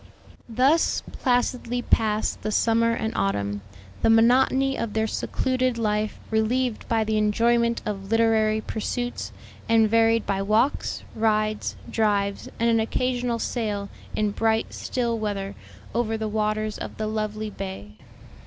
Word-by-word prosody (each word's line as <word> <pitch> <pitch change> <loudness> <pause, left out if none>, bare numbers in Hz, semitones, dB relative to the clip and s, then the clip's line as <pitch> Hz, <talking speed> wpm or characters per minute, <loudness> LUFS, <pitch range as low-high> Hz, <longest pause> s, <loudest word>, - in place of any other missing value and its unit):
Thus 265 +8 +2
placidly 245 -1 0
passed 215 -2 +1
the 215 - -2
summer 230 +2 +3
and 220 -1 -2
autumn, 100 +1 -1 0.4
the - - +3
monotony 260 +4 +4
of 230 -5 -3
their 220 0 +1
secluded 255 +2 -1
life 215 -1 -1
relieved 230 +2 0
by 225 -1 +2
the 215 0 0
enjoyment 235 +2 +2
of 195 -2 -4
literary 220 -1 +3
pursuits, 245 +3 -3 0.4
and 225 -1 +5
varied 225 0 +3
by 195 -1 -1
walks, 220 +7 +1
rides, 215 -1 0
drives, 205 -2 0
and 230 - +2
an 230 -1 +3
occasional 245 +1 0
sail, 210 -4 -2 0.3
in 210 -1 +1
bright, 220 +1 0
still 235 -2 -2
weather, 200 -2 -3 0.4
over 225 -1 0
the 220 0 -2
waters 215 0 -1
of - - -7
the 215 - -2
lovely 215 0 -3
bay. 190 - -7
220 Hz, 135 wpm, -25 LUFS, 210-235 Hz, 0.4 s, and